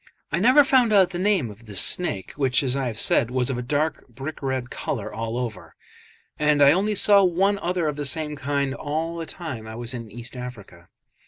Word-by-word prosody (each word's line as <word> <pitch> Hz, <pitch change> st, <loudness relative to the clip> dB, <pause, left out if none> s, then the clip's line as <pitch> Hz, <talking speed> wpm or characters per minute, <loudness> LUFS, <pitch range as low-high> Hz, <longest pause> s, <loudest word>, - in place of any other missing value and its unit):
I 170 Hz, -, 0 dB
never 255 Hz, +8 st, +6 dB
found 255 Hz, -4 st, +3 dB
out 190 Hz, -3 st, +5 dB
the 175 Hz, -, -4 dB
name 185 Hz, -, +1 dB
of 110 Hz, +3 st, -16 dB
this 100 Hz, -3 st, +1 dB
snake, 100 Hz, -, 0 dB
which, 135 Hz, -2 st, +1 dB
as 130 Hz, -1 st, 0 dB
I 135 Hz, -2 st, -1 dB
have 115 Hz, -3 st, -5 dB
said, 115 Hz, -, +2 dB
was 125 Hz, +1 st, 0 dB
of 125 Hz, -, -3 dB
a -, -, -2 dB
dark 150 Hz, +5 st, -2 dB
brick 135 Hz, +5 st, -8 dB
red 130 Hz, -2 st, -3 dB
colour 110 Hz, -1 st, -4 dB
all 115 Hz, +1 st, -4 dB
over; 110 Hz, -8 st, -6 dB, 0.6 s
and 150 Hz, -1 st, +3 dB
I 140 Hz, 0 st, +7 dB
only 200 Hz, +6 st, +1 dB
saw 200 Hz, 0 st, +5 dB
one 195 Hz, +3 st, +2 dB
other 175 Hz, -2 st, -1 dB
of 150 Hz, -1 st, -2 dB
the 145 Hz, -, -3 dB
same 150 Hz, +1 st, -2 dB
kind 140 Hz, -1 st, -1 dB
all 160 Hz, +4 st, -3 dB
the 165 Hz, -1 st, -5 dB
time 130 Hz, -11 st, -7 dB
I 110 Hz, -, -8 dB
was 120 Hz, +1 st, -4 dB
in 115 Hz, -3 st, -7 dB
East 120 Hz, +4 st, -8 dB
Africa. 105 Hz, -9 st, -10 dB
140 Hz, 220 wpm, -24 LUFS, 120-170 Hz, 0.6 s, I